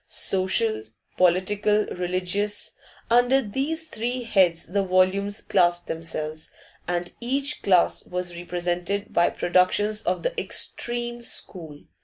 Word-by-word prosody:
Social, 425 - 0 0.3
political, 205 +4 +2
religious, 185 +3 -2 0.4
under 245 +3 +5
these 275 +8 -3
three 245 0 -3
heads 185 -7 +2
the 200 +3 0
volumes 190 +2 +1
classed 175 -2 +2
themselves, 155 -1 -5 0.4
and 175 0 -2
each 275 +4 -2
class 180 -3 +3
was 180 -1 -4
represented 175 +3 -3
by 170 - +4
productions 205 +4 +1
of - - -1
the - - -1
'extreme' 240 - +1
school. 160 -9 -7
195 Hz, 110 wpm, -25 LUFS, 175-235 Hz, 0.4 s, under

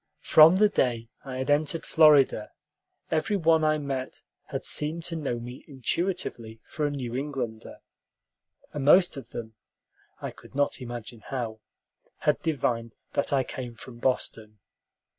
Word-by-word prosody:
From 160 +3 +8
the 210 +2 +5
day 120 - 0
I 135 -2 -6
had 130 +2 -1
entered 150 +2 +1
Florida, 145 -8 +5 0.6
every 160 +7 +1
one 160 -2 +3
I 155 0 +3
met 135 -3 -4 0.2
had - - -5
seemed 155 +3 0
to 170 - -3
know 140 -7 -2
me 120 +2 -9
intuitively 130 -5 -3
for 150 -1 -2
a - - -1
New 125 -4 -4
Englander, 130 -5 -4 1.0
and 145 - -3
most 175 +5 +6
of 135 - -9
them 110 -1 -7 0.7
I - - -5
could - - -17
not 145 -1 0
imagine 120 -2 -7
how 115 -5 -4 0.6
had - - +2
divined 120 -7 -1 0.2
that 140 - 0
I 135 -2 +3
came 125 -2 -7
from 120 0 -11
Boston. 110 -4 -2
135 Hz, 145 wpm, -27 LUFS, 120-155 Hz, 1.0 s, From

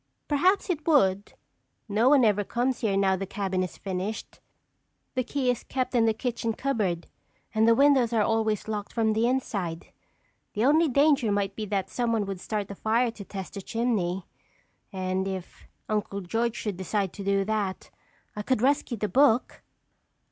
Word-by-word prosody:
"Perhaps 365 +7 +2
it 310 -3 -4
would. 200 - +3 0.5
No 220 +4 +3
one 275 -4 +6
ever 205 -1 +3
comes 245 +4 -1
here 200 -4 0
now 195 -1 +3
the 195 +1 -4
cabin 190 -2 -2
is 185 - -4
finished. 195 +3 -5 0.7
The 255 - 0
key 255 0 0
is 245 - -4
kept 255 -1 -2
in 230 -2 +3
the 220 - +3
kitchen 235 -1 -2
cupboard 210 -10 -1 0.5
and 220 0 +3
the 230 - +6
windows 275 -3 +4
are 225 -2 +2
always 220 -1 0
locked 210 -2 -4
from 220 -2 +2
the 225 +2 +2
inside. 200 -10 -2 0.6
The 215 +3 +1
only 315 +4 +5
danger 280 -4 +3
might 200 -1 -1
be 215 -1 -4
that 195 -2 -2
someone 230 -4 0
would 195 -2 -5
start 205 0 -3
a - - -6
fire 230 +4 +1
to 215 -3 -10
test 195 -1 -7
the 200 - -6
chimney. 195 -6 -1 0.7
And 185 0 -2
if 190 -2 -7 0.2
Uncle 205 -2 -2
George 225 +5 -1
should 205 -4 -4
decide 190 0 -2
to 200 - -7
do 195 0 +1
that, 205 -3 -2 0.4
I 210 - -3
could 245 +1 0
rescue 270 -3 +1
the 210 - -1
book." 260 0 +3
220 Hz, 175 wpm, -27 LUFS, 195-245 Hz, 0.7 s, one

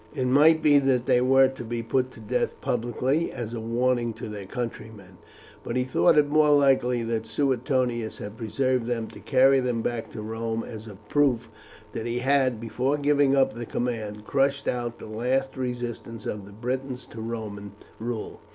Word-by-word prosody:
It 130 - -1
might 150 +5 +5
be 145 -2 +6
that 130 -3 +1
they 125 - +3
were 135 +1 +5
to 130 -2 -7
be 115 0 -4
put 130 +3 0
to - - -13
death 110 - -2
publicly, 130 +7 0
as 120 -2 -5
a 115 - -3
warning 120 +1 0
to - - -7
their 100 -2 -7
countrymen; 110 -6 -7 0.4
but 115 - -4
he 125 - +2
thought 130 +4 +3
it 150 -1 +5
more 150 +1 +4
likely 135 -4 +3
that 115 -1 -2
Suetonius 125 -2 0
had 105 +1 -7
preserved 125 +2 -1
them 115 -2 -1
to - - -12
carry 135 0 +4
them 125 -3 -1
back 120 -2 -3
to 110 - -6
Rome 115 +1 -3
as 110 -1 -9
a 105 - -9
proof 125 +4 0 0.4
that 115 - -4
he 120 +1 -2
had, 130 -2 +2
before 125 +5 -1
giving 145 -1 +3
up 135 -1 +3
the 120 -1 -6
command, 110 -4 -3
crushed 140 0 +1
out 120 -1 -2
the - - -10
last 125 +5 -1
resistance 120 -3 -5
of 100 -2 -4
the - - -12
Britons 125 +4 -4
to 115 - -7
Roman 105 -3 -6 0.3
rule. 115 -1 -5
120 Hz, 185 wpm, -26 LUFS, 115-135 Hz, 0.4 s, be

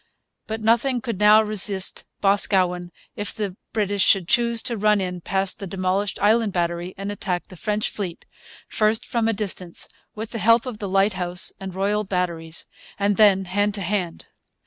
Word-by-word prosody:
But 220 0 -4
nothing 235 +4 +2
could 230 -4 -4
now 210 +1 +7
resist 205 -2 0 0.2
Boscawen 185 -3 +2 0.2
if 205 - -3
the 205 -4 -4 0.2
British 205 -2 0
should 190 -3 +4
choose 235 +1 +3
to 240 - -2
run 210 0 +3
in 180 -2 -3
past 190 +2 -1
the 195 - -5
demolished 190 +2 -1
Island 220 -1 +3
Battery 175 +1 -2
and 200 +1 -4
attack 185 -3 -3
the 185 - -11
French 210 +4 -1
fleet, 185 -5 -6 0.4
first 215 +1 +1
from 235 -3 0
a - - +3
distance, 190 -4 -1 0.3
with 220 +1 -6
the 230 - -4
help 230 +2 +4
of 240 -5 -6
the 200 - -4
Lighthouse 185 -2 +1
and 190 -1 -7
Royal 205 +2 0
Batteries, 175 -4 -3 0.3
and 200 0 +1
then 195 -3 +5
hand 205 +3 0
to 200 - -4
hand. 180 -2 -2
200 Hz, 170 wpm, -23 LUFS, 185-215 Hz, 0.4 s, now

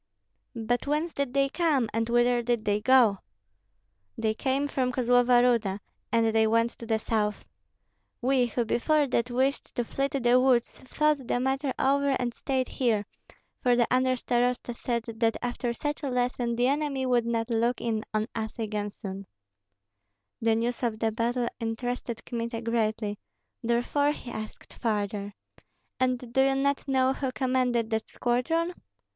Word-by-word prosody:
"But 240 +3 -1
whence 305 +3 0
did 280 -3 -2
they 275 0 +4
come, 290 -5 +1
and 225 +1 -1
whither 240 0 +3
did 235 -2 -1
they 205 0 +1
go?" 235 -5 +5 1.0
"They 220 -1 0
came 270 +5 0
from 255 -3 0
Kozlova 245 0 +4
Ruda, 225 -6 +2 0.3
and 225 -1 +2
they 220 0 +4
went 230 +1 +2
to 230 - -8
the 220 -1 +2
south. 215 -1 -1 0.7
We, 255 -1 +2
who 240 +1 -1
before 295 +7 +2
that 245 -2 0
wished 260 +3 -1
to 240 - 0
flee 275 +4 -1
to 280 - -2
the 245 0 +4
woods, 255 -2 +2
thought 295 0 0
the 245 - +1
matter 265 +2 0
over 280 0 +2
and 245 -1 -1
stayed 260 0 -1
here, 225 -5 0 0.6
for 245 -1 +3
the 240 -1 +3
under 255 0 +3
starosta 245 0 0
said 235 -1 -2
that 225 0 +1
after 245 0 -2
such 295 +5 -3
a 280 - -2
lesson 245 -1 0
the 245 +1 +2
enemy 280 -1 0
would 245 -2 +2
not 230 0 -1
look 235 +2 +1
in 220 -2 -1
on 215 0 0
us 220 +1 -4
again 210 -2 -2
soon." 195 -1 -8 1.1
The 225 -1 +3
news 235 +2 -1
of 235 -3 -1
the 220 0 0
battle 235 +2 0
interested 235 0 -4
Kmita 230 -1 -4
greatly, 220 -3 -1 0.4
therefore 245 +5 +1
he 245 - -9
asked 215 -1 -8
further: 205 -2 -2 0.6
"And 250 -2 -1
do 265 - +4
you 270 0 +3
not 280 +1 0
know 265 -1 +3
who 270 -1 -3
commanded 250 -3 0
that 220 0 -1
squadron?" 325 +9 0
245 Hz, 165 wpm, -27 LUFS, 225-260 Hz, 1.1 s, go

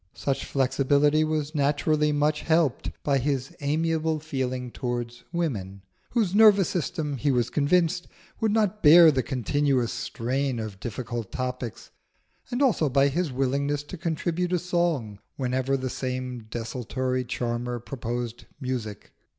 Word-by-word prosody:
Such 135 -1 -2
flexibility 140 +3 +2
was 155 -1 -1
naturally 150 +1 +2
much 150 +1 +1
helped 160 -5 +1
by 140 -2 +2
his 135 -1 -2
amiable 160 +2 0
feeling 130 -4 -3
towards 120 -1 -4
woman, 100 - -3 0.3
whose 215 -7 +1
nervous 205 -3 +6
system, 150 -4 -2
he 140 +4 0
was 125 -3 +1
convinced, 165 +4 +2 0.3
would 220 -2 +1
not 210 -1 +1
bear 165 +1 +9
the 135 -3 +1
continuous 130 0 0
strain 130 +1 -2
of 105 -3 -6
difficult 120 0 -5
topics; 125 -2 -5 0.6
and 245 +3 0
also 200 - +3
by 135 +1 +4
his 165 +1 -1
willingness 140 +2 0
to 145 - -8
contribute 175 +1 -2
a - - +4
song 170 - -1 0.2
whenever 130 +1 0
the 130 0 -3
same 125 -2 -4
desultory 125 +3 -2
charmer 120 0 -2
proposed 120 -1 -5
music. 125 -6 -5
140 Hz, 135 wpm, -26 LUFS, 125-155 Hz, 0.6 s, bear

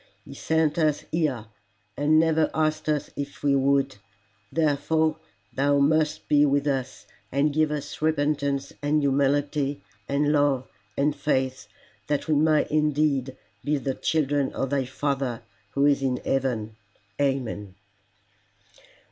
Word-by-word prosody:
He - - -10
sent 160 0 0
us 155 -2 +1
here, 145 -9 0 0.5
and 150 +2 +3
never 160 -1 +2
asked 155 0 0
us 150 -2 -1
if 140 0 -6
we 140 -1 +3
would; 135 -2 +2 0.5
therefore 155 0 +1 0.4
thou 140 +1 +2
must 150 +2 +1
be 145 -1 +4
with 140 0 +2
us, 135 -3 -2 0.3
and 140 +2 +1
give 155 0 +2
us 145 -1 -5
repentance 145 -3 0
and 145 +1 +1
humility 140 +1 +1 0.3
and 145 +1 +2
love 145 -3 +2 0.3
and 145 +1 +1
faith, 130 -6 -1 0.4
that 145 +1 -1
we 155 - +2
may 155 +1 +3
indeed 150 -3 +1 0.3
be 150 0 +1
the 135 -1 -2
children 145 -2 0
of 135 0 -2
thy 140 -2 +1
Father 135 -2 -2 0.3
who 140 0 +3
is 145 -1 +3
in 130 -2 0
heaven. 115 -5 -1 0.4
Amen." 120 -8 -2
145 Hz, 130 wpm, -25 LUFS, 135-150 Hz, 0.5 s, be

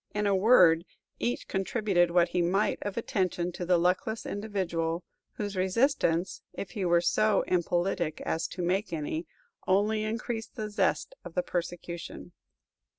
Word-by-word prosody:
In 210 0 0
a 200 -1 +3
word, 185 -6 +6 0.4
each 240 - -2
contributed 190 -3 +1
what 170 0 +3
he 175 0 0
might 185 +4 +1
of 205 +1 -4
attention 180 -5 -1
to 175 0 -5
the 180 -1 +5
luckless 180 +6 0
individual, 180 -5 -2 0.3
whose 205 -1 -4
resistance 190 - +1
if 200 - -6
he 205 -5 -3
were 175 -1 +4
so 210 +4 +3
impolitic 175 -2 0
as 165 - -1
to 180 0 -5
make 190 +4 0
any 160 +1 -3 0.4
only 210 +3 +2
increased 225 +1 -4
the 215 -1 -4
zest 210 - 0
of 165 - -10
the 180 - +1
persecution. 175 0 -5
185 Hz, 150 wpm, -29 LUFS, 175-210 Hz, 0.4 s, word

